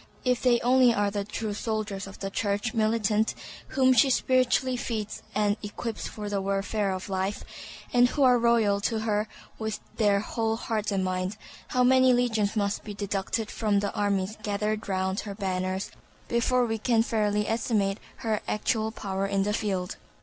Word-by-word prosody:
If 250 -1 +2
they 245 -2 +4
only 250 0 +5
are 205 -1 +1
the 200 0 -2
true 210 +1 -4
soldiers 210 -2 -3
of 195 - -10
the 195 0 -5
Church 205 +3 -1
militant 220 -1 +1 0.3
whom 260 -1 +4
she 255 +3 +5
spiritually 255 0 +2
feeds 220 -4 -4
and 205 0 +2
equips 220 +2 -5
for 210 -1 -6
the 200 -1 -1
warfare 195 +1 -1
of 185 +1 -4
life, 190 +1 -2 0.5
and 245 0 +6
who 285 - +1
are 250 -2 +6
loyal 225 -4 +3
to 220 +1 0
her 215 -1 0 0.3
with 220 -1 -3 0.2
their 205 -3 +3
whole 225 +1 -1
heart 220 -2 -2
and 190 -1 0
mind, 185 +2 -2 0.3
how 250 - +2
many 260 0 +5
legions 225 -4 +1
must 200 -1 0
be 205 -1 -7
deducted 205 +2 -2
from 210 -3 +1
the 200 0 -2
armies 200 0 0
gathered 210 0 -2
round 190 +1 0
her 200 -2 -5
banners 185 -1 -2 0.4
before 245 +1 +2
we 225 -1 -2
can 225 0 +3
fairly 210 -2 0
estimate 215 -3 0 0.3
her 215 -2 0
actual 220 +1 0
power 195 -3 -3
in 195 0 +1
the 210 +1 0
field! 190 -4 -2
210 Hz, 170 wpm, -27 LUFS, 200-230 Hz, 0.5 s, and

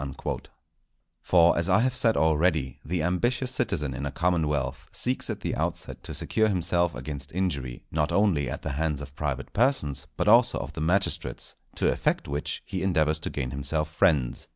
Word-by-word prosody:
_" 70 -1 -5 0.8
For, 85 -1 +5
as 85 +2 0
I 95 +4 +5
have 130 +1 +1
said 115 -3 +2
already, 80 -2 +2
the 85 +2 -1
ambitious 120 +9 0
citizen 80 - -1
in 70 +3 -3
a - - -4
commonwealth 75 -6 0
seeks 125 +1 -1
at - - -4
the - - -2
outset - - -3
to - - -4
secure 110 0 +1
himself 85 -3 +1
against 70 +2 -5
injury, 70 -10 -2
not 75 -1 0
only 95 -9 +2
at - - -5
the 80 - -2
hands 75 0 -1
of 70 0 -11
private 70 -3 -3
persons, 75 - +1
but - - 0
also 120 +3 +6
of - - -5
the 80 - -5
magistrates; 95 +5 0 0.2
to - - +2
effect - - 0
which 70 +1 -3
he 95 - -4
endeavours 80 -5 +2
to - - -4
gain 65 -2 -3
himself 75 +3 -1
friends. 75 -7 +1
80 Hz, 180 wpm, -27 LUFS, 70-95 Hz, 0.8 s, also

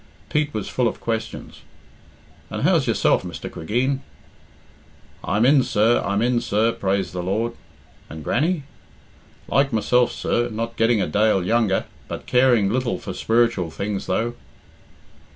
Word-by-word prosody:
Pete 150 -1 +1
was 110 -5 -4
full 125 -2 +1
of - - -4
questions. 115 -1 -5 0.9
"And - - -4
how's - - +3
yourself, - - +2
Mr. - - -7
Cregeen?" 125 +11 -1 1.2
"I'm 105 +5 +1
in, 140 +1 +6
sir, 115 0 +2
I'm 100 +3 0
in, 120 -1 +2
sir, 110 +3 +1
praise 100 -2 -1
the 90 - -4
Lord." 110 +6 -1 0.6
"And 80 -1 -8
Grannie?" 160 - 0 0.8
"Like 135 +4 +2
myself, 120 +2 +2
sir, 120 0 -1
not 115 +1 -4
getting 115 -3 +2
a - - -2
dale 105 -3 +2
younger, 110 -2 +1 0.2
but - - -6
caring 125 -5 +4
little 120 +3 0
for - - -7
spiritual 115 -6 +1
things, 100 +4 -4
though." 115 +6 0
115 Hz, 140 wpm, -22 LUFS, 100-125 Hz, 1.2 s, in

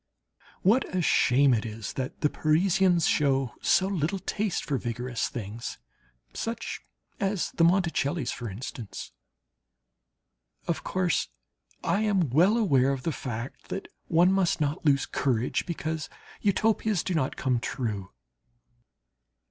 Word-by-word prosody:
What 220 0 +3
a - - +2
shame 135 -2 +4
it 110 - +1
is 110 -1 -6
that 130 -1 -5
the 150 - +3
Parisians 175 +2 +3
show 135 -4 +2
so 190 - +4
little 190 -1 -1
taste 205 +1 -2
for 140 -4 -1
vigorous 120 0 -2
things, 115 0 -6 0.6
such 230 0 -4 0.4
as 195 -2 0
the 165 - +1
Monticelli's, 165 -5 +2
for 120 -2 -5
instance. 110 +1 -7 1.6
Of 170 - -1
course 185 -2 0 0.6
I 200 - +1
am 195 - +1
well 180 - +5
aware 140 - +3
of 135 -2 -3
the 165 - 0
fact 120 -3 -6
that 195 - -5 0.2
one 175 +2 +4
must 190 -3 +2
not 150 +2 -1
lose 140 -3 +3
courage 125 -3 0
because 160 -2 -3 0.3
Utopias 210 -1 +2
do 185 - -2
not 145 -6 0
come 125 -3 0
true. 105 -6 -3
155 Hz, 130 wpm, -27 LUFS, 125-185 Hz, 1.6 s, well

